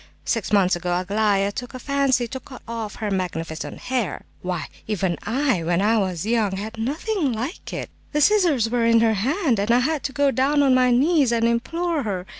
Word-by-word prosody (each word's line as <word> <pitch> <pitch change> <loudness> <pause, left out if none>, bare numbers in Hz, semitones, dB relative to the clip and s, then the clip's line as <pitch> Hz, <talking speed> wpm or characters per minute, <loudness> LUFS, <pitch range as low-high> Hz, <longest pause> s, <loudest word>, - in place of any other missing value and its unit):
Six 230 - -1
months 195 -3 +4
ago 175 0 -1
Aglaya 200 +1 +1
took 245 +5 -7
a - - -6
fancy 275 -2 +1
to 260 - -5
cut 260 0 -13
off 225 -3 -5
her 210 -2 -3
magnificent 165 -4 -3
hair. 250 -6 -2 0.2
Why, 180 -1 -3 0.2
even 190 -5 0
I, 255 - +1
when 170 +1 0
I 220 +3 +3
was 185 -3 -2
young, 220 -3 +1
had 215 +3 -6
nothing 300 - -1
like 240 - -5
it! - - -5 0.2
The 300 - 0
scissors 330 - +4
were 240 +1 0
in 230 0 +4
her 225 -1 +3
hand, 260 - 0
and 205 +2 -1
I 235 - +5
had 305 +2 0
to - - -1
go 280 0 +2
down 285 +3 +2
on 270 -2 +4
my 255 0 +4
knees 275 +1 +3
and 230 -1 +2
implore 330 +8 -1
her... 195 -6 -3
230 Hz, 205 wpm, -23 LUFS, 200-275 Hz, 0.2 s, I